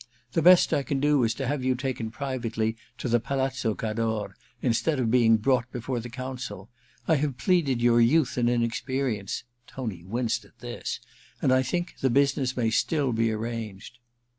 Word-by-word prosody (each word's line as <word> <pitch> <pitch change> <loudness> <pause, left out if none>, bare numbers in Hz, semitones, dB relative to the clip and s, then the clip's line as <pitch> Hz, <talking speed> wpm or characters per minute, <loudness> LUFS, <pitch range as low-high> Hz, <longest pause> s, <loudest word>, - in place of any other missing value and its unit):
The 165 - +1
best 180 +2 +6
I - - +2
can 135 +1 -2
do 145 -2 +3
is 115 -1 +1
to 135 - -3
have 140 0 -1
you 130 0 +2
taken 125 -3 -3
privately 115 -3 -2 0.2
to - - -4
the 120 0 +3
Palazzo 130 -3 -1
Cador, 110 -2 -2 0.2
instead 130 +5 +1
of 115 -3 +1
being 115 -2 +5
brought 125 +2 +1
before 125 +1 -3
the 120 +1 -7
Council. 125 -5 -6 0.4
I 160 - +4
have 140 -3 -1
pleaded 140 -8 +1
your 120 0 +5
youth 130 +4 +3
and 120 -1 +2
inexperience' 120 -2 -1
— 120 - -41
Tony 110 -10 -5
winced 115 +3 -1
at 100 +3 -22
this 120 0 -5
— - - -26
' - - -31
and 130 - +3
I 130 - +4
think 175 +7 -3
the 130 - +3
business 135 0 +2
may 115 -2 +1
still 140 +1 +1
be 115 0 +1
arranged.' 110 0 -5
125 Hz, 190 wpm, -27 LUFS, 115-135 Hz, 0.4 s, best